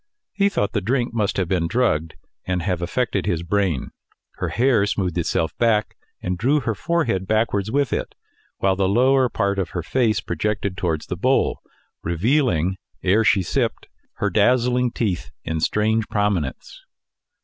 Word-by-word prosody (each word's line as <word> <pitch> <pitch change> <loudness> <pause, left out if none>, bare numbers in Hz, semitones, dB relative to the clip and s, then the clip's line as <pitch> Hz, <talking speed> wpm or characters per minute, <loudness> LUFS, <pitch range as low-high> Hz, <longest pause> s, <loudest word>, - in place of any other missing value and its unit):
He 200 0 +2
thought 165 - -1
the 100 - -1
drink 120 +4 0
must 105 -4 0
have 95 -3 0
been 85 -2 0
drugged 80 -7 0 0.3
and 90 -2 -1
have 90 -2 -1
affected 100 0 -1
his 85 -4 0
brain. 90 -5 0 0.5
Her - - -2
hair 120 -3 +3
smoothed 90 -4 -1
itself 80 -1 -1
back, 110 -3 +2 0.3
and 90 0 -2
drew 140 +8 +3
her 115 -2 -1
forehead 105 - -1
backwards 110 -2 +1
with 140 0 +1
it; - - -3 0.4
while 95 -1 +2
the 95 -1 +1
lower 130 +4 +4
part 100 -2 0
of 95 - -1
her 85 - -2
face 115 +2 +1
projected 100 +2 -2
towards 85 -5 -2
the 90 - -4
bowl, 130 +8 +1 0.4
revealing, 95 - +1 0.3
ere 105 +5 +3
she 100 -3 +3
sipped, - - -1 0.3
her - - -1
dazzling 125 0 +3
teeth 105 -7 -2
in 80 0 -2
strange 110 +5 +1
prominence. 105 - -2
100 Hz, 160 wpm, -22 LUFS, 90-120 Hz, 0.5 s, lower